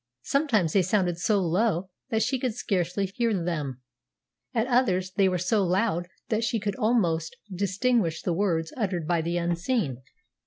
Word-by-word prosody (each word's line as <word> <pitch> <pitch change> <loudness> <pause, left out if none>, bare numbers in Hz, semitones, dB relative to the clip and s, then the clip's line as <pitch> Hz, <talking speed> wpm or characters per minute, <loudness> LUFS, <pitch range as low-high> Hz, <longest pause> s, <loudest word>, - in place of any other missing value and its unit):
Sometimes 230 - +1
they 195 - +5
sounded 180 -2 +1
so 200 +5 +2
low 185 +1 0 0.2
that 220 -3 +1
she 250 +3 0
could 245 -3 -1
scarcely 180 +1 -1
hear 230 +5 -1
them; 150 -8 -3 0.7
at 225 -2 +1
others 205 -8 +2
they 190 0 +3
were 180 - 0
so 195 +4 +1
loud 180 -1 +1 0.2
that 220 0 +1
she 225 0 0
could 205 -1 -2
almost 185 -9 +1 0.2
distinguish 200 -1 0
the 175 - 0
words 165 -3 0
uttered 185 -9 -2
by 170 -1 +2
the 170 +2 -1
unseen. 170 - -1
190 Hz, 160 wpm, -27 LUFS, 170-220 Hz, 0.7 s, they